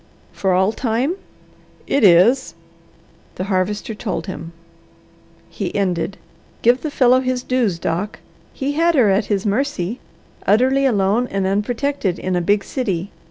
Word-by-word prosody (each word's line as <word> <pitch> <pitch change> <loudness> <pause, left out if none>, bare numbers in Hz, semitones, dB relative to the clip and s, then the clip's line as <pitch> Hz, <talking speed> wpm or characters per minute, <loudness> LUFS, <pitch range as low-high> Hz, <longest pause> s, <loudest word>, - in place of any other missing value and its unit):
"For 190 - 0
all 190 +3 +3
time?" 240 +6 -1 0.7
"It 280 - +1
is." 205 +8 +5 0.8
The - - -3
Harvester 200 +3 -1
told 210 -1 -4
him. 170 -3 -7 1.0
He - - -5
ended, 190 -1 -1 0.5
"Give 245 +3 +4
the 310 - -3
fellow 255 -3 +4
his 255 -1 -2
dues, 240 -9 0
Doc. 175 +5 -3 0.3
He 275 +1 -3
had 330 +3 +2
her 230 -8 +4
at 200 +2 +2
his 200 -1 -1
mercy, 220 -2 -1 0.5
utterly 260 +6 +3
alone 210 +1 +1
and 195 -3 -2
unprotected, 210 +1 -1
in 185 -1 -2
a 175 - +1
big 200 +3 +2
city. 200 -8 -3
210 Hz, 140 wpm, -20 LUFS, 190-255 Hz, 1.0 s, is